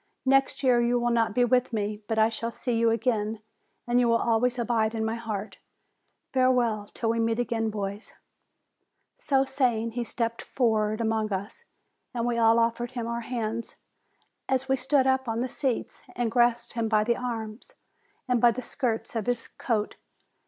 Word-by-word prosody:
Next 270 +1 +2
year 245 -2 +4
you 240 +1 +2
will 240 0 +1
not 225 -2 +1
be 245 - +4
with 250 +1 +2
me; 210 -1 -2
but 225 - -1
I 220 0 +5
shall 230 +1 -4
see 235 +1 -3
you 230 0 +3
again, 225 -2 0 0.5
and 240 0 +2
you 245 - +3
will 230 0 +4
always 235 +2 +1
abide 230 -2 0
in 220 0 -1
my 220 - -1
heart. 220 -3 -5 0.7
Farewell 250 -5 +2
until 225 +1 -2
we 230 - -1
meet 225 0 +1
again, 230 -2 -1
boys 205 0 -5 0.5
!" - - -51
So 270 -1 +4
saying, 245 -4 0
he 240 +1 -2
stepped 230 0 -2
forward 215 -3 0
among 220 -1 0
us, 205 - -5 0.5
and 235 -1 -1
we 240 -1 0
all 225 0 +5
offered 235 +1 0
him 240 -3 -3
our 235 0 -3
hands, 230 -1 -4 0.7
as 265 0 +1
we 265 - +3
stood 270 +1 +2
up 265 -1 +1
on 225 0 -1
the 255 - 0
seats, 255 -1 -3
and 240 -2 -1
grasped 240 0 +2
him 230 -2 -1
by 215 -1 +3
the 235 +2 +1
arms, 225 -2 -5 0.5
and 250 -2 +2
by 240 - +7
the 250 +2 -3
skirts 235 -3 -2
of 220 -3 -2
his 245 -1 -1
coat. 215 -4 -2
235 Hz, 185 wpm, -27 LUFS, 225-245 Hz, 0.7 s, by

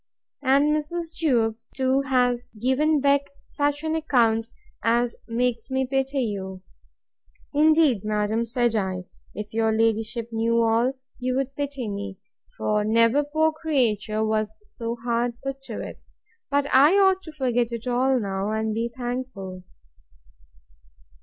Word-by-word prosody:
And 280 +2 +4
Mrs. 325 +2 -4
Jewkes 230 -6 0
too 265 0 +2
has 250 -2 +1
given 285 +5 +2
Beck 280 0 +3 0.2
such 290 0 -1
an 315 0 -1
account, 230 -8 +2 0.3
as 235 +1 +1
makes 235 0 -1
me 265 0 0
pity 270 +1 0
you. 190 -4 -5 0.9
Indeed, 300 - +4
madam, 210 +1 0
said 240 0 +1
I, 190 -3 -1 0.3
if 210 0 -6
your 225 0 +2
ladyship 225 +1 0
knew 230 +1 +1
all, 230 +3 +2 0.3
you 255 0 -1
would 270 +1 -2
pity 280 -4 -3
me; 200 -1 -5 0.4
for 210 0 +1
never 230 +6 +3
poor 315 +2 +1
creature 230 -9 0
was 215 -1 0
so 235 - -5
hard 235 0 -1
put 270 0 -4
to - - -6
it. - - -8 0.5
But 285 0 +2
I 290 +7 +7
ought 385 -1 +4
to 320 - -8
forget 245 -5 0
it 235 0 -5
all 255 +1 +2
now, 195 -1 -2
and 220 0 -1
be 230 +2 -1
thankful. 240 -7 -5
245 Hz, 140 wpm, -25 LUFS, 220-275 Hz, 0.9 s, I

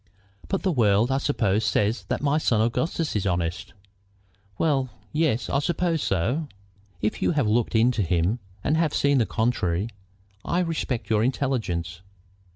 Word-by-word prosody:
"But 195 - -2
the 190 - +2
world, 115 -3 +3
I 135 - +2
suppose, 110 -8 +1
says 110 +2 +1
that - - -3
my 145 +2 +2
son 115 -7 +2
Augustus 150 +8 0
is 100 -2 0
honest?" 85 -1 -2 0.8
"Well, 135 -5 +1 0.2
yes; 150 -6 +1
I 140 - +1
should 145 - -3
suppose 170 -2 0
so." 125 - 0 0.6
"If 105 - -1
you - - +2
have 145 -5 +1
looked 115 +2 +1
into 115 0 +3
him 90 +5 +1 0.2
and 155 - +1
have 160 -3 +1
seen 140 -1 +3
the 115 - +2
contrary, 110 -4 0 0.5
I 180 - 0
respect 155 -9 -2
your 110 0 +3
intelligence." 110 - -1
120 Hz, 160 wpm, -25 LUFS, 105-150 Hz, 0.8 s, world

